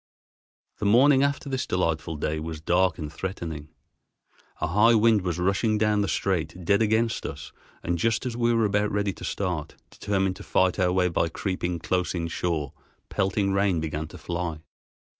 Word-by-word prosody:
The 105 - 0
morning 135 +6 +6
after 140 0 0
this 130 -2 -2
delightful 85 -2 -1
day 75 +1 -2
was 80 0 -5
dark 90 +1 +2
and 75 -2 -6
threatening. 80 -4 -5 0.9
A - - 0
high 105 +7 +4
wind 110 -1 +4
was 90 -3 -2
rushing 100 +4 +1
down 105 -1 +2
the 100 - 0
strait 90 -3 -2
dead 100 +3 +3
against 110 +1 +1
us, - - -7 0.3
and 85 0 -1
just 115 +6 +1
as 125 -2 -3
we 120 0 +2
were 115 -1 +3
about 105 +1 +1
ready 100 -1 0
to - - -12
start, 90 -6 -3 0.2
determined 95 -2 -1
to - - -10
fight 95 +1 +1
our 90 -1 +3
way 90 0 +2
by 85 -1 0
creeping 90 0 -2
close 90 +2 -1
inshore, 85 -3 -2 0.4
pelting 100 0 0
rain 100 -3 +2
began 80 0 -3
to - - -11
fly. 85 -3 -4
95 Hz, 175 wpm, -26 LUFS, 85-105 Hz, 0.9 s, morning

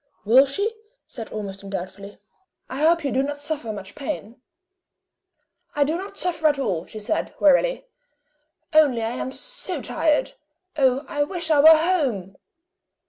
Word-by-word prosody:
"Will 255 +6 +6
she?" 405 +11 -1 0.3
said 225 -4 -9
Ormiston, 200 -2 -6
doubtfully. 195 +1 -7 0.5
"I 260 - -6
hope 330 +2 +3
you 275 - 0
do 265 - +2
not 290 +1 -3
suffer 290 -6 -4
much 200 -2 -8
pain!" 260 -5 -6 1.3
"I 295 - +4
do 305 +3 -1
not 385 +3 -6
suffer 330 -3 +1
at 295 -1 +2
all," 185 -11 -2
she - - -10
said, 215 +10 -2
wearily; 405 - +3 0.9
"only 285 -7 +4
I 225 - -1
am 255 +1 -4
so - - -4
tired. 310 +9 0 0.4
Oh, 270 -1 +2
I 290 - -2
wish 335 +1 -3
I 300 - +5
were 295 - +8
home!" 305 - +3
280 Hz, 150 wpm, -23 LUFS, 220-315 Hz, 1.3 s, were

